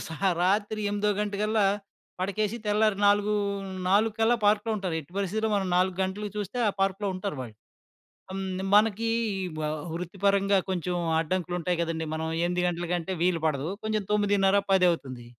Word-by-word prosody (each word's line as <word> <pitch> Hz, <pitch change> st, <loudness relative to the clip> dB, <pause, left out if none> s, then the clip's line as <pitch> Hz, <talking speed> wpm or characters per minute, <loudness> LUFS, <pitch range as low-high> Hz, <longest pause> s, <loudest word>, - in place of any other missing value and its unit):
సా 160 Hz, -, -6 dB, 0.3 s
రాత్రి 205 Hz, +3 st, +1 dB
ఎనిమిదో 205 Hz, 0 st, 0 dB
గంటకల్లా 210 Hz, +1 st, +1 dB, 0.6 s
పడకేసి, 205 Hz, +4 st, -1 dB
తెల్లారి 210 Hz, -1 st, +2 dB
నాలుగు 205 Hz, +1 st, +3 dB, 0.6 s
4 225 Hz, +3 st, +3 dB
పార్క్‌లో 210 Hz, +2 st, +3 dB
ఉంటారు. 185 Hz, -4 st, -3 dB
ఎట్టి 155 Hz, +3 st, -17 dB
పరిస్థితిలో 215 Hz, +3 st, 0 dB
మనం 195 Hz, -2 st, 0 dB
4 185 Hz, 0 st, +2 dB
గంటలకి 200 Hz, +2 st, -3 dB
చూస్తే 210 Hz, +4 st, -4 dB
ఆ -, -, +3 dB
పార్క్‌లో 195 Hz, +1 st, 0 dB
ఉంటారు 185 Hz, -4 st, -4 dB
వాళ్ళు. 115 Hz, -4 st, -7 dB, 0.8 s
ఆహ్, 190 Hz, -, -4 dB
హ్మ్, 190 Hz, 0 st, -3 dB
మనకి 225 Hz, +1 st, +3 dB, 0.5 s
వ -, -, -2 dB, 0.3 s
వృత్తిపరంగా 195 Hz, +3 st, +1 dB
కొంచెం 180 Hz, -1 st, -1 dB, 0.2 s
అడ్డంకులు 175 Hz, +2 st, -1 dB
ఉంటాయి 175 Hz, 0 st, -1 dB
కదండీ! 160 Hz, -1 st, -2 dB
మనం 160 Hz, 0 st, -2 dB, 0.2 s
8 180 Hz, 0 st, 0 dB
గంటల 175 Hz, 0 st, -2 dB
కంటే 175 Hz, +2 st, -2 dB
వీలుపడదు. 160 Hz, -4 st, +1 dB
కొంచెం 215 Hz, -1 st, -1 dB
9:30 200 Hz, -1 st, +3 dB
పదవుతుంది. 165 Hz, -10 st, +1 dB
195 Hz, 145 wpm, -27 LUFS, 175-210 Hz, 0.8 s, నాలుగు